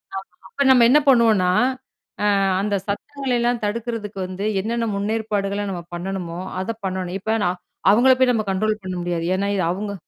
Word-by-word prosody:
ஆமா. 195 - -2 0.3
அப்ப 280 - -5
நம்ம 250 -3 +7
என்ன 295 +3 +6
பண்ணுவோம்னா, 220 -8 +4 0.7
ஆ, - - +2 0.4
அந்த 205 0 0
சத்தங்களையெல்லாம் 245 0 -1
தடுக்கிறதுக்கு 215 -1 -3
வந்து 185 +2 -5 0.2
என்னென்ன 230 +2 -2
முன்னேற்பாடுகள 205 -1 -1
நம்ம 175 -2 -4
பண்ணணுமோ 175 -1 -4 0.2
அத 225 +4 -3
பண்ணணும். 185 0 -3
இப்ப 220 +3 0
நான் 180 0 -1 0.3
அவங்கள 245 +5 +5
போய் 255 -1 +4
நம்ம 215 -2 0
கண்ட்ரோல் 215 +2 -1
பண்ண 185 -1 -4
முடியாது. 170 -1 -2
ஏனா 200 +1 -1
இது 185 - +1
அவுங்க 200 +2 -4
205 Hz, 160 wpm, -22 LUFS, 190-230 Hz, 0.7 s, நம்ம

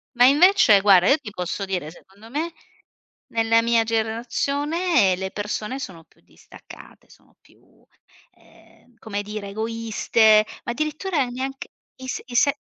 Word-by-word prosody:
Ma 245 +1 +6
invece 285 - +6
guarda, 195 -2 +5
io 280 - +5
ti 235 -8 -10
posso 180 +1 -4
dire, 180 -5 -4
secondo 195 +6 -17
me, 320 +5 -3 0.8
nella 225 0 +3
mia 230 -1 +2
generazione 240 - 0
le 190 0 -4
persone 210 +4 -4
sono 170 -11 -9
più - - -31
distaccate, - - -16
sono - - -23
più, - - -27 0.5
ehm, 245 - -24
come 205 -3 -5
dire, 210 -1 -7
egoiste, 220 0 +2 0.2
ma - - -3
addirittura 305 +2 -2
neanche 265 +2 -6 0.3
i 260 - -9
s - - -4
i 240 - -9
se 280 +3 +3
230 Hz, 140 wpm, -22 LUFS, 205-270 Hz, 0.8 s, Ma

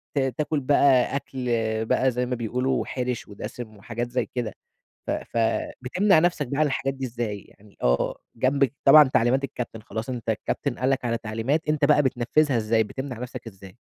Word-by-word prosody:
ت 140 - +3 0.2
تاكل 150 0 0
بقى 135 -1 +3
أكل 130 -2 -4 0.4
بقى 130 +3 +2
زي 125 +1 -1
ما 125 0 -2
بيقولوا 125 +3 -1
حِرش 125 -2 -3
ودسم 110 +2 -8
وحاجات 120 +4 -4
زي 125 -2 0
كده. 115 -4 -2 0.5
ف - - 0
ف - - -4 0.4
بتمنع 185 +7 +3
نفسك 170 -4 +1
بقى 140 +4 -3
عن 155 - +4
الحاجات 135 -1 -1
دي 135 -1 -4
إزاي؟ 115 -4 -4
يعني 100 0 -21
آه - - +2 0.2
جنبك 135 +2 +2
طبعًا 150 +2 +10
تعليمات 125 +4 +3
الكابتن 120 -4 -5
خلاص 110 +2 -6
أنتَ 120 -3 -4
الكابتن 120 +4 -2
قال 130 +2 +1
لك 135 -2 0
على 115 -1 0
تعليمات 115 +9 -2
أنتَ 150 -1 +2
بقى 150 0 +5
بتنفذها 130 +2 +2
إزاي؟ 110 0 +2
بتمنع 130 +2 -6
نفسك 125 -1 -7
إزاي؟ 95 0 -12
125 Hz, 180 wpm, -25 LUFS, 115-140 Hz, 0.5 s, طبعًا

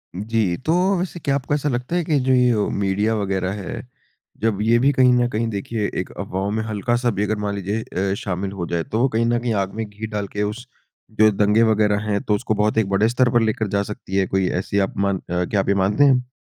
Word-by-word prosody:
जी, 105 -2 0
तो 155 +5 -1 0.3
वैसे 180 -1 -4
क्या 140 -3 0
आपको 140 +1 -2
ऐसा 145 0 0
लगता 125 +5 -2
है 175 - +1
कि 150 -3 +2
जो 130 0 +1
यो 125 -4 +3
मीडिया 100 +3 0
वग़ैरह 95 -3 -1
है, 90 - -6 0.6
जब 105 -2 0
ये 115 +2 +4
भी 135 +3 +4
कहीं 130 -1 +5
न 120 0 +3
कहीं 115 0 -1
देखिए 105 +1 -2
एक - - -4
अफ़वाहों 95 +2 -3
में 110 +1 -1
हल्का-सा 120 +3 0
भी 105 +1 -1
अगर 110 0 -1
मान 105 -1 -2
लीजिए 100 +3 -2 0.3
अ, - - +1
शामिल 95 0 -3
हो 95 -3 -4
जाए 85 -1 -1
तो 110 - -3
वो 130 - +4
कहीं 115 0 +1
न 120 0 +1
कहीं 120 -1 -1
आग 95 - -8
में 110 0 -3
घी 105 +2 -7
डाल 105 -2 -3
के 105 +1 -3
उस 115 +5 -4 0.5
जो 110 0 +7
दंगे 105 +3 +3
वग़ैरह 105 -2 +2
हैं 100 -1 0
तो 105 - +1
उसको 105 - -1
बहुत 105 +1 +1
एक 110 -3 +2
बड़े 100 +3 +2
स्तर 125 +1 +2
पर 120 - +4
लेकर 110 -1 0
जा 100 +1 0
सकती 100 -2 -7
है 95 -1 +2
कोई 95 -1 0
ऐसी 100 +2 -1
आप - - -13
मान 100 -1 +1
अ, 90 0 -3
क्या 100 - 0
आप 95 - -1
ये 100 - +3
मानते 100 +8 +2
हैं? 130 -3 +3
105 Hz, 250 wpm, -21 LUFS, 100-120 Hz, 0.6 s, जो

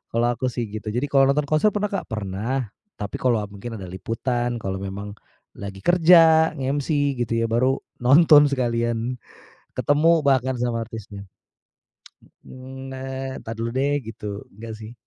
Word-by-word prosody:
kalau 120 +1 +3
aku 130 +2 -2
sih 120 -1 -2
gitu, 110 0 -7
jadi 125 - 0
kalau 135 -1 +5
nonton 145 +2 +2
konser 155 +9 +2
pernah 210 0 -1
nggak? 195 - -3
Pernah, 110 +3 -3 0.2
tapi 105 -1 -5
kalau 120 -4 +1
mungkin 115 +4 -7
ada 100 - -8
liputan 120 +6 -2
kalau 95 0 -3
memang 100 +1 -6 0.5
lagi 100 -1 -8
kerja, 165 -2 +6
nge-MC 140 0 -1
gitu 115 -1 -1
ya, - - +2
baru 130 +3 +2 0.2
nonton 145 +3 +7
sekalian, 120 -2 -1 0.6
ketemu 155 +2 +3
bahkan 130 -2 +2
sama 120 -1 -1
artisnya. 100 -3 -9 1.2
Eee, 130 +1 -10
na 130 - -6 0.4
entar 115 - -7
dulu 115 +1 -3
deh 140 +2 +1 0.2
gitu, 115 -1 -9 0.3
enggak 110 +2 -8
sih. 110 +1 -9
125 Hz, 150 wpm, -23 LUFS, 115-140 Hz, 1.2 s, nonton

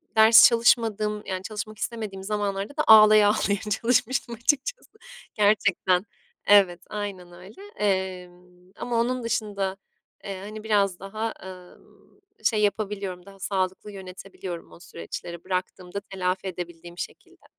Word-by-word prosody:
ders 220 +1 +9
çalışmadığım, 220 -3 +2
yani 185 -1 -4
çalışmak 215 +1 -6
istemediğim 215 -4 -5
zamanlarda 205 +5 -3
da 305 - +2
ağlaya 215 -1 +8
ağlaya 205 -1 +1 0.2
çalışmıştım 245 0 +1
açıkçası. 290 - -1 0.4
Gerçekten 200 -3 +2 0.5
Evet, 190 -4 +5
aynen 200 -4 -6
öyle. 185 - -14 0.2
Emm, 180 -2 -3
ama 240 -1 -2
onun 250 +1 0
dışında, 205 -4 -2 0.5
eee, 195 -1 -6
hani 210 +2 -8
biraz 200 -4 +1
daha, 215 +3 -4
ımm, 185 - -15 0.2
şey 215 -1 +2
yapabiliyorum, 200 -3 -2
daha 195 0 -15
sağlıklı 190 +1 -2
yönetebiliyorum 185 -2 -9
o - - -15
süreçleri 170 - -8
bıraktığımda 185 0 -4
telafi 190 -1 -3
edebildiğim 175 -1 -8
şekilde. - - -9
200 Hz, 120 wpm, -25 LUFS, 185-215 Hz, 0.5 s, ders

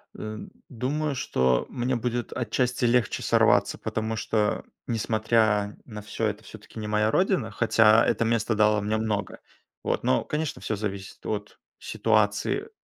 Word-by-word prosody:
Эм, 110 0 -7 0.2
думаю, 140 +4 -2
что 65 - +1
мне 125 +1 -1
будет 120 0 -2
отчасти 125 +1 0
легче 120 -2 +1
сорваться, - - +3
потому 110 0 -3
что, 105 0 0 0.2
несмотря 110 -2 +1
на 105 -3 -8
всё- 110 +2 -3
это 105 -1 -4
всё-таки 110 +1 -11
не 105 - -4
моя 105 +1 +2
родина, 180 - +1
хотя 110 +1 +4
это 115 - +1
место 115 0 +1
дало 105 0 +3
мне 105 +1 0
много. 105 -3 -2 0.4
Вот, - - -1
но, - - +2
конечно, 150 -1 -3
всё 110 - -2
зависит 100 -2 -6
от 105 -1 -4 0.2
ситуации 110 - 0
110 Hz, 145 wpm, -26 LUFS, 105-120 Hz, 0.4 s, хотя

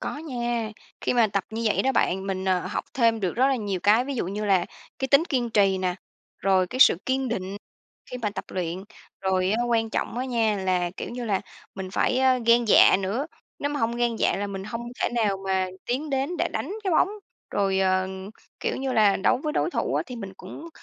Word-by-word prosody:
Có - - -4
nha, 240 -7 -3 0.3
khi - - 0
mà 235 -2 +5
tập 200 -2 -2
như 225 +1 -4
vậy 210 - +2
đó 265 - +2
bạn, 190 -5 +1
mình, 190 -1 -2
à, 185 -1 +2
học 185 +4 -4
thêm 230 -3 +3
được 185 0 -2
rất 260 +3 +4
là 270 - +2
nhiều 200 -5 -3
cái. 220 +4 +4
Ví 275 0 -4
dụ 230 - -2
như 205 +3 -3
là 190 -4 +3 0.3
cái 265 - -2
tính 280 +4 +5
kiên 250 -8 -1
trì 195 -3 +3
nè, 185 -1 -1 0.4
rồi 190 -1 +2
cái 255 - -6
sự 220 - +8
kiên 265 0 0
định 195 -3 -3 0.6
khi 250 - -4
mà 220 -4 -1
tập 200 - -6
luyện. 180 0 -4 0.4
Rồi 190 +1 +1
quan 225 -1 +1
trọng 235 - -2
á 255 - -1
nha, 225 -4 +1
là, 185 -2 0
kiểu - - -5
như 245 0 -5
là, 200 -4 0 0.3
mình 190 -1 -6
phải 250 +5 +1 0.3
gan 235 0 +5
dạ - - +7
nữa, 220 +11 -2 0.3
nếu 285 - -1
mà 290 - -2
hông 230 +1 0
gan 240 -1 0
dạ - - +1
là 205 +1 -2
mình 195 -1 -5
hông 230 +3 -5 0.2
thể - - +2
nào 215 -5 0
mà 190 -1 +1 0.2
tiến 270 +6 -2
đến 275 +6 -1
để - - +1
đánh - - -3
cái 380 - 0
bóng. 345 - +4 0.4
Rồi, 195 -1 +1
ờ, 185 0 +2 0.5
kiểu - - -1
như 265 -1 -2
là 210 -2 +5
đấu 190 - +2
với 305 -1 -1
đối - - +1
thủ - - -1
á - - +1
thì 250 - -8
mình 200 -5 -7
cũng 295 - -9
220 Hz, 230 wpm, -25 LUFS, 190-250 Hz, 0.6 s, sự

